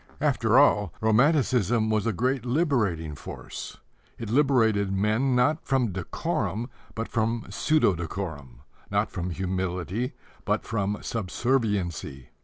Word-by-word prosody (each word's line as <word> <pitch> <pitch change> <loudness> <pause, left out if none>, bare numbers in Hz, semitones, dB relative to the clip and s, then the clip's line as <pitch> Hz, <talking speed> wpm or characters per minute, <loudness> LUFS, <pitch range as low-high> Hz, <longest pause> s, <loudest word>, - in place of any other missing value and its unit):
After 125 -6 +2
all, 105 - +4
romanticism 120 - +3
was 110 0 +1
a - - +2
great 125 +5 0
liberating 120 - 0
force. - - -8 0.4
It 115 -3 -5
liberated 115 -8 +3
men, 110 +7 +1
not 145 +6 +2
from 125 -5 +1
decorum, 100 +5 -3 0.2
but 115 0 -3
from 115 0 -1
pseudo 155 -10 +3
decorum 80 -8 -6 0.3
not 100 +1 0
from 90 -2 -3
humility, 95 - -2 0.3
but - - 0
from 105 -2 -1
subserviency. 100 - -1
110 Hz, 115 wpm, -26 LUFS, 95-125 Hz, 0.4 s, all